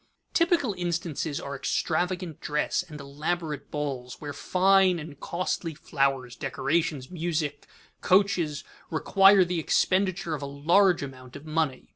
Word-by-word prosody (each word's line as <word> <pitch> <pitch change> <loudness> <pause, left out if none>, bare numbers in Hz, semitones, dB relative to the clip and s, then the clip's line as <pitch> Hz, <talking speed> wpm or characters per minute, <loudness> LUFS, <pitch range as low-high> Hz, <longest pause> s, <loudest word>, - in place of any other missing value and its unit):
_ - - -43
Typical 335 - +2
instances 170 -4 -2
are 140 0 -5
extravagant 175 +4 -1
dress 150 +3 0
and 160 -4 -10
elaborate 150 +2 -4
balls 135 -4 -4
where 145 -1 -6
fine 190 +1 +3
and 150 -3 -9
costly 170 -2 -3
flowers, 135 -4 -1
decorations, 140 +2 -1
music, 160 -4 -2 0.3
coaches, 180 -6 +2 0.3
require 195 +4 +5
the 175 -1 -1
expenditure 185 +1 +1
of 150 - -4
a 140 - -4
large 170 +6 +3
amount 130 -2 -9
of 145 +2 -10
money. 155 -4 -1
160 Hz, 130 wpm, -27 LUFS, 140-180 Hz, 0.3 s, require